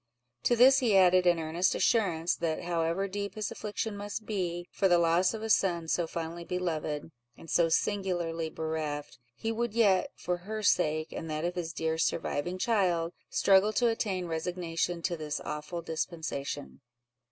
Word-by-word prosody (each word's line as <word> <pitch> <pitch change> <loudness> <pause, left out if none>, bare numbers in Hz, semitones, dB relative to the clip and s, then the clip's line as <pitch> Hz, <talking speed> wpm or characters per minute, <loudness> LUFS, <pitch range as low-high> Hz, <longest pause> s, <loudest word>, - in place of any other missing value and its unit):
To 240 - +4
this 260 +3 +7
he 225 -7 +3
added 185 -1 +5
an 175 -1 +5
earnest 165 +3 0
assurance, 175 -7 +2
that 165 0 -2
however 170 +2 0
deep 200 +2 -4
his 215 -2 -3
affliction 210 0 -4
must 205 +2 -5
be, 175 -4 -3
for 195 - +2
the 175 -1 +5
loss 170 +4 +3
of 220 - -6
a 225 - -3
son 170 -5 +2
so 170 +1 0
fondly 170 +1 -5
beloved, 160 -4 -3 0.3
and - - -13
so 170 -1 +3
singularly 170 -3 0
bereft, 155 -3 -4 0.2
he 225 - -3
would 230 -1 -2
yet, 200 -5 +4
for 180 0 -2
her 215 +4 -6
sake, 155 -4 +2
and 165 - -6
that 155 +1 -2
of 175 - -1
his 170 -2 -4
dear 160 0 -2
surviving 165 +2 -1
child, 180 -6 +1 0.2
struggle 195 +2 +4
to 240 +2 +3
attain 195 -5 -1
resignation 170 0 -2
to 175 - 0
this 155 -2 -4
awful 150 +3 -5
dispensation. 160 -4 -4
175 Hz, 165 wpm, -30 LUFS, 165-200 Hz, 0.3 s, this